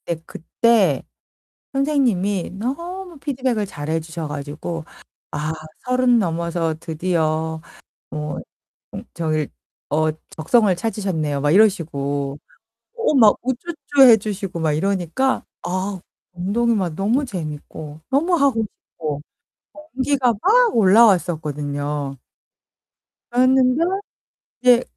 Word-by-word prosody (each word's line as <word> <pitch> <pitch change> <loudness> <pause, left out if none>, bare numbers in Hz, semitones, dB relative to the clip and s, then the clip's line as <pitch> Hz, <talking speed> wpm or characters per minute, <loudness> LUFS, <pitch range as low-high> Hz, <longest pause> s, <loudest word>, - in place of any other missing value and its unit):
네, 170 - -1
그때 195 - +2 0.7
선생님이 240 - +1
너무 340 - -5
피드백을 255 -6 -1
잘해 160 -3 -3
주셔 160 0 -6
가지고 150 +3 -5 0.5
"아, 150 +1 -2 0.3
30 250 -1 +3
넘어서 170 -2 -1
드디어 160 -1 -1 0.5
뭐 150 0 -4 0.5
음, - - -6
저기 155 -3 -1 0.4
어, 155 +2 +2 0.2
적성을 200 +5 +3
찾으셨네요." 175 -8 -2
막 145 +1 +2
이러시고. 145 -8 +1 0.6
어, 460 -9 +1
막 225 -6 +6
우쭈쭈 280 +3 0
해 230 - +9
주시고 195 -4 -4
막 160 -2 +1
이러니까 195 - 0 0.2
아. 185 +1 -3 0.3
운동이 215 +7 +1
막 185 -6 -1
너무 225 - +1
재밌고, 155 - -7
너무 295 +7 +2
하고 275 -7 +2
싶고 155 -8 -6 0.7
동기가 260 -2 +2
막 475 +3 +4
올라왔었거든요. 150 -9 +2 1.1
그랬는데 255 +2 +4 0.8
이제 250 -1 +5
190 Hz, 220 characters per minute, -21 LUFS, 155-250 Hz, 1.1 s, 해